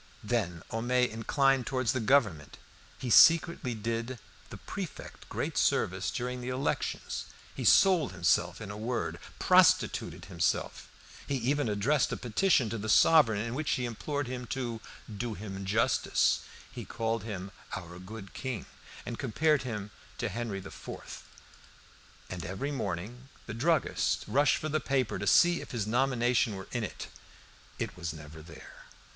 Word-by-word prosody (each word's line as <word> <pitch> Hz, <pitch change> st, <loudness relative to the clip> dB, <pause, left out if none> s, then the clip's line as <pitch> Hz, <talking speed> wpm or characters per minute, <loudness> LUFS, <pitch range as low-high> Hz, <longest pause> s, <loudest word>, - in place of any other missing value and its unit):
Then 105 Hz, -7 st, -1 dB
Homais 125 Hz, +2 st, +2 dB
inclined 135 Hz, +3 st, +2 dB
towards 130 Hz, -4 st, +1 dB
the 130 Hz, -, 0 dB
Government. 105 Hz, -, +2 dB, 0.4 s
He 125 Hz, -, -4 dB
secretly 165 Hz, -4 st, +6 dB
did 115 Hz, +3 st, -3 dB, 0.3 s
the -, -, -8 dB
prefect -, -, -8 dB
great -, -, -2 dB
service 95 Hz, 0 st, +1 dB
during 125 Hz, +2 st, -3 dB
the 125 Hz, -, -4 dB
elections. 130 Hz, +2 st, -2 dB, 0.3 s
He -, -, -5 dB
sold 180 Hz, -7 st, +5 dB
himself 85 Hz, -2 st, +1 dB
in 105 Hz, -1 st, -7 dB
a 105 Hz, -, -7 dB
word, 120 Hz, +3 st, -3 dB, 0.2 s
prostituted -, -, +3 dB
himself. 85 Hz, -3 st, -1 dB, 0.4 s
He 140 Hz, -, 0 dB
even 135 Hz, +1 st, 0 dB
addressed 120 Hz, +8 st, +1 dB
a -, -, -2 dB
petition 125 Hz, -, +2 dB
to 115 Hz, -, -3 dB
the 110 Hz, +2 st, -4 dB
sovereign 115 Hz, -5 st, +5 dB
in 115 Hz, +1 st, -3 dB
which 150 Hz, +3 st, -2 dB
he 125 Hz, -, -1 dB
implored 145 Hz, +5 st, -3 dB
him 125 Hz, 0 st, -5 dB
to 120 Hz, -4 st, -3 dB, 0.4 s
"do 115 Hz, 0 st, -3 dB
him 100 Hz, -2 st, -6 dB
justice"; 105 Hz, +4 st, +2 dB, 0.3 s
he -, -, -7 dB
called 115 Hz, 0 st, -2 dB
him 100 Hz, -3 st, -6 dB, 0.2 s
"our 90 Hz, 0 st, -8 dB
good 95 Hz, 0 st, -9 dB
king," 130 Hz, -7 st, -4 dB, 0.4 s
and 120 Hz, -, -5 dB
compared 145 Hz, +4 st, +2 dB
him 105 Hz, -5 st, -5 dB, 0.3 s
to -, -, -2 dB
Henri 115 Hz, -4 st, -3 dB
IV. 95 Hz, 0 st, -9 dB, 1.0 s
And 90 Hz, -2 st, -6 dB
every 95 Hz, -, -3 dB
morning 120 Hz, +2 st, -4 dB, 0.2 s
the 110 Hz, -, -6 dB
druggist 155 Hz, +8 st, +1 dB
rushed 145 Hz, +2 st, +3 dB
for 155 Hz, -, -4 dB
the 155 Hz, +1 st, +1 dB
paper 135 Hz, -5 st, 0 dB
to -, -, -3 dB
see 175 Hz, 0 st, +5 dB
if -, -, -10 dB
his 115 Hz, -5 st, -2 dB
nomination 120 Hz, -1 st, +2 dB
were 95 Hz, -1 st, -8 dB
in 120 Hz, -2 st, -2 dB
it. 100 Hz, -, -6 dB, 0.7 s
It -, -, -4 dB
was 85 Hz, -2 st, -4 dB
never 80 Hz, 0 st, -11 dB
there. 80 Hz, -1 st, -13 dB
115 Hz, 150 wpm, -30 LUFS, 100-130 Hz, 1.0 s, secretly